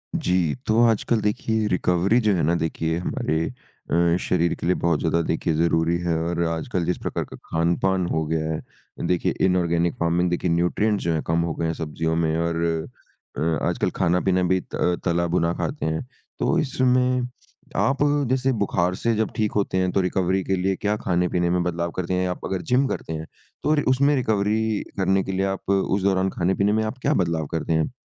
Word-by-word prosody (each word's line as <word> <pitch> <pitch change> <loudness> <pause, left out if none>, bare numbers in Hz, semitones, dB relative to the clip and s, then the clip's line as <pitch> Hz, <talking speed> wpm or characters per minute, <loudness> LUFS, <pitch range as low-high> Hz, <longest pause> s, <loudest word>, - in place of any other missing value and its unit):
जी, 90 -4 +1
तो 110 +2 +3
आजकल 115 0 +1
देखिए 105 +1 0
रिकवरी 90 +4 +2
जो 105 -2 +2
है 85 - 0
ना 85 +3 +2
देखिए 80 0 -1
हमारे 80 -2 -1 0.5
अ, 85 0 +3
शरीर 85 -1 +1
के - - -6
लिए 90 - +3
बहुत 85 -3 +1
ज़्यादा 85 +1 +1
देखिए 80 0 0
ज़रूरी 85 +1 +2
हैं। 85 -1 0
और 85 +1 -1
आजकल 85 +3 -2
जिस 90 - 0
प्रकार - - -2
का - - -11
खान-पान 90 +3 +1
हो 80 -2 -1
गया 80 0 -1
है 80 - -8
देखिए 90 -1 +1
इनॉर्गेनिक 85 -2 +1
फ़ार्मिंग 85 +1 +1
देखिए 90 +1 -1
न्यूट्रिएंट्स 100 +5 +1
जो 85 - +1
हैं 80 - 0
कम 80 +1 +2
हो 85 -1 -1
गए 85 - -2
हैं 80 - 0
सब्ज़ियों 80 0 -2
में 80 -1 +1
और 85 0 -1 0.8
अ, - - -3 0.3
आजकल - - 0
खाना-पीना 90 0 +2
भी 95 +1 +2
त - - -9
अ, 90 - +1
तला-भुना 85 -1 +1
खाते 145 - -3
हैं, 80 0 -1 0.4
तो - - +1
इसमें 125 -3 +2 0.6
आप 135 0 +2 0.3
जैसे 130 +1 +2
बुखार 90 -2 +1
से 115 +3 0
जब 110 0 0
ठीक 105 -1 0
होते 100 -2 0
हैं, 95 -1 +1
तो 95 - +2
रिकवरी 95 +1 0
के 95 - 0
लिए 95 +1 0
क्या 105 +2 -1
खाने-पीने 90 -1 +1
में 90 0 +1
बदलाव 85 -1 -2
करते 95 0 -2
हैं? 90 0 +1
आप 90 - -5
अगर 95 - -2
जिम 130 +2 +4
करते 80 - -4
हैं 80 0 -5 0.4
तो 150 - +3
रि 150 - +2
उसमें 140 +3 +3
रिकवरी 110 -2 0
करने 95 0 +2
के - - -4
लिए 95 +1 0
आप 95 0 -4
उस 95 0 +1
दौरान 95 -1 +2
खाने-पीने 95 +3 +1
में 110 0 +1
आप 110 +4 -4
क्या 145 - +3
बदलाव 80 -3 -2
करते 80 0 -1
हैं? 80 +5 +1
90 Hz, 200 wpm, -23 LUFS, 85-100 Hz, 0.8 s, जिम